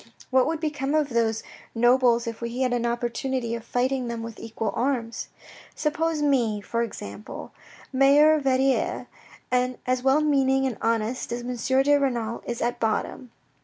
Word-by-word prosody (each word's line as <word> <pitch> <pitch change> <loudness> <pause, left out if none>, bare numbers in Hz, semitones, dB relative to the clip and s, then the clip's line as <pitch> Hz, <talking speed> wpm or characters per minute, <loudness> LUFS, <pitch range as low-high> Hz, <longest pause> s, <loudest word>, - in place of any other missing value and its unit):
What 260 -1 +4
would 320 0 -1
become 295 -2 -1
of 300 -2 +2
those 225 -2 0 0.3
nobles 240 0 +4
if 230 0 -6
we 235 +2 -3
had 255 -1 +1
an 240 -1 0
opportunity 240 +1 -2
of 230 -1 -4
fighting 250 +2 -1
them 230 -1 -4
with 230 -1 -8
equal 225 -1 -3
arms. 235 -2 -1 0.5
Suppose 310 0 0
me, 240 -7 +2
for 230 +3 -2
example, 105 - -7 0.4
mayor 280 +4 +6
of 310 - +1
Verrieres, 265 0 +1 0.5
and 250 0 +1
as 255 0 0
well 270 +3 +3
meaning 270 -3 +2
and 255 -5 -3
honest 230 +2 -1
as 240 +1 -3
M. 250 +2 +1
de 290 +1 +4
Renal 235 -5 -1
is 240 -1 -2
at 240 0 -1
bottom. 225 +3 -2
250 Hz, 165 wpm, -25 LUFS, 230-270 Hz, 0.5 s, mayor